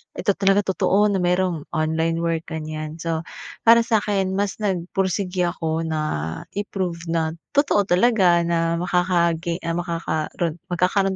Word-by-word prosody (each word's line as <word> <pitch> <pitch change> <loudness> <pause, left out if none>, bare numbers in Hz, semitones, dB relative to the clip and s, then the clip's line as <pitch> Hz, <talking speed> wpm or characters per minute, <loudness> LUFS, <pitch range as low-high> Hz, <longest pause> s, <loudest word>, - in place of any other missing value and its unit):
ito 205 - +1
talaga 195 +1 +4
totoo 200 +4 +3
na 195 - 0
merong 180 -3 +1
online 160 +1 0
work 165 -1 -1
ganyan. 155 -1 -5
So 165 0 -2 0.4
para 230 0 +8
sa'kin 205 -5 +1
mas 200 0 -1
nagpursige 185 -1 -1
ako 165 -1 -2
na 160 -1 -2 0.5
i-prove 180 -4 -3
na 160 -1 0 0.2
totoo 285 -8 +3
talaga 185 -3 +4
na 170 0 0
makaka 175 -1 +2
ge 170 +1 -3
ah 165 0 -1
makakaron 170 -1 -2 0.2
magkakaroon 190 +2 +1
175 Hz, 135 wpm, -22 LUFS, 165-195 Hz, 0.5 s, para